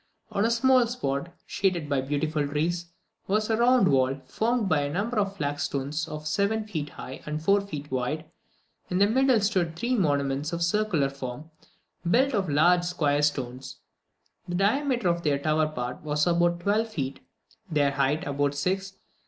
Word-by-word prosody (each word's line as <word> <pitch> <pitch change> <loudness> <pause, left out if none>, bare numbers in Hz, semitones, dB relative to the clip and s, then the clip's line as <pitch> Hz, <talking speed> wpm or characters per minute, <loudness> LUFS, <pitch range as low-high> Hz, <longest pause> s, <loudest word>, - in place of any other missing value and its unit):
On 200 - 0
a 225 - +3
small 255 +1 +4
spot, 170 - -2 0.2
shaded 180 -6 0
by 140 -2 +1
beautiful 145 +2 -1
trees, 170 +4 -1 0.4
was 215 +3 +1
a 220 - +2
round 240 -3 +4
wall, 135 -1 +2
formed 230 - 0
of 195 - -2
a 145 0 -1
number 210 +8 -1
of 200 -1 -1
flagstones 145 0 -2
of 155 0 -7
seven 205 +7 0
feet 155 -8 -4
high 130 - -9
and 150 0 -2
four 200 +4 +4
feet 150 -8 -7
wide; 130 +5 -2 0.6
in 180 - 0
the 200 - +5
middle 255 +2 +3
stood 185 -5 0
three 240 +9 -1
monuments 145 - 0
of 170 - -2
a - - +3
circular 170 -6 +1
form, 140 +3 -7 0.6
built 265 +8 +3
of 195 -6 0
large 175 +5 +4
square 150 -5 +1
stones. 130 -3 -2 0.7
The 175 - -3
diameter 240 +3 +1
of 170 0 +1
their 145 -4 +1
tower 155 +2 +1
part 125 -4 -5
was 150 0 0
about 175 0 +2
twelve 215 +4 +1
feet, 140 -9 -4 0.5
their 145 -3 +2
height 140 +2 0
about 145 0 0
six. 190 +6 -1
165 Hz, 170 wpm, -27 LUFS, 145-200 Hz, 0.7 s, the